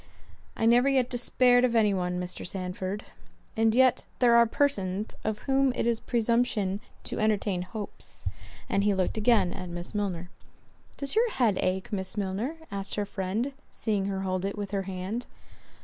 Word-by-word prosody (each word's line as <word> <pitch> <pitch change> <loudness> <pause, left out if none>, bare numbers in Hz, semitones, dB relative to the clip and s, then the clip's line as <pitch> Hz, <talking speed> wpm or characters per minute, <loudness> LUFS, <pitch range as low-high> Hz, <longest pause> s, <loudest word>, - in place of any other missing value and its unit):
"I 225 - +1
never 245 +4 +5
yet 260 -3 +2
despaired 245 0 +4
of 245 -2 +2
any 210 -3 +4
one, 180 -1 -1
Mr. 180 0 -4
Sandford." 185 +2 -4 0.5
"And 225 0 +3
yet 260 0 +4
there 245 -2 +5
are 235 0 +7
persons, 210 -7 0
of 215 -1 -2
whom 270 0 +3
it - - 0
is 235 -1 +1
presumption 230 -5 +1 0.2
to - - -3
entertain 210 -4 +1
hopes." 205 +3 -8 0.4
And 200 - +1
he 205 -1 +3
looked 190 +3 0
again 210 -5 +3
at 185 -1 -6
Miss 175 0 -5
Milner. 185 -4 -2 0.7
"Does 280 -1 +1
your 465 +2 +4
head 230 - +2
ache, 190 +2 -1
Miss 190 +1 -3
Milner?" 205 +9 -2 0.2
asked 195 0 -3
her 205 - -1
friend, 205 +7 -2 0.2
seeing 205 -4 -1
her 195 -1 -2
hold 185 -1 -1
it 200 +2 -2
with 200 -1 -4
her 200 -1 0
hand. 190 +6 -4
210 Hz, 170 wpm, -28 LUFS, 190-235 Hz, 0.7 s, are